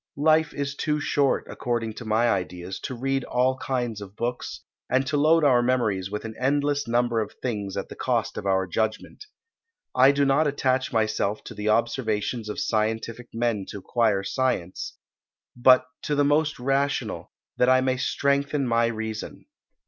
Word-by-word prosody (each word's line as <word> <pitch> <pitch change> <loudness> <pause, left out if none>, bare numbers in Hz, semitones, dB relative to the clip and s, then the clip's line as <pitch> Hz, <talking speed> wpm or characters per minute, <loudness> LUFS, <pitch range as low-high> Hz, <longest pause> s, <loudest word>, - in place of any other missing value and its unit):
Life 155 +1 +3
is 140 0 -2
too 150 +1 -1
short, 140 -2 +1
according 120 -2 -2
to 115 - -9
my 110 +2 +2
ideas, 90 -2 -2
to 130 - -4
read 135 +2 -1
all 130 +1 +1
kinds 120 -5 -2
of 100 0 -10
books, 120 +2 -4 0.3
and 130 +1 +2
to 140 +3 -1
load 155 +3 +4
our 130 -4 +5
memories 110 -7 0
with 105 +2 -5
an 110 - -5
endless 145 +1 +1
number 120 0 +1
of 105 -1 -3
things 105 -6 -3
at - - -3
the - - -10
cost - - -1
of - - -4
our 95 -1 +2
judgment. 110 - -3 0.7
I 130 +2 +7
do 140 0 +2
not 140 +3 +3
attach 130 -2 0
myself 110 -2 0
to - - -9
the 105 0 -2
observations 115 -1 0
of 105 - -4
scientific 110 +2 -1
men 115 -4 -1
to - - -6
acquire 105 0 +1
science; 100 -6 -2 0.6
but 130 +1 +6 0.2
to 150 - -1
the 145 0 +3
most 150 +1 +2
rational, 135 +2 -1 0.3
that 125 - +4
I 130 0 +5
may 130 0 +1
strengthen 140 +1 0
my 115 -1 +2
reason. 110 -1 -5
120 Hz, 170 wpm, -25 LUFS, 110-135 Hz, 0.7 s, I